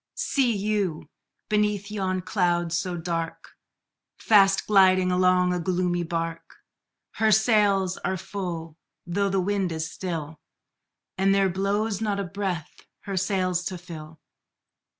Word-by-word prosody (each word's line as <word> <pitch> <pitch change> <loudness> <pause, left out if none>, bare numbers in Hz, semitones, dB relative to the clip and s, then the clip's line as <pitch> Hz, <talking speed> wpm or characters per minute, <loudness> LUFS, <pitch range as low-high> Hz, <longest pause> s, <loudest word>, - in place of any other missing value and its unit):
See 250 -6 +1
you, 200 -5 -1 0.4
beneath 210 -1 0
yon 190 -3 -1
cloud 175 -3 0
so 175 +1 -1
dark, 165 -1 -4 0.7
Fast 195 -3 +4
gliding 185 -2 +4
along 180 0 +3
a 180 - -1
gloomy 175 0 0
bark? 165 0 -4 0.6
Her 220 -1 +3
sails 205 -3 +3
are 190 - -2
full, 170 -4 -6 0.3
though 200 +3 0
the 195 0 +1
wind 195 -1 0
is 160 0 -3
still, 165 -4 -5 0.8
And 195 +1 +3
there 195 -1 +3
blows 200 +3 -1
not 205 -2 -1
a - - -1
breath 180 -3 -4 0.3
her 200 -2 -5
sails 185 -2 0
to 185 - -3
fill! 160 -3 -10
185 Hz, 130 wpm, -25 LUFS, 175-200 Hz, 0.8 s, Fast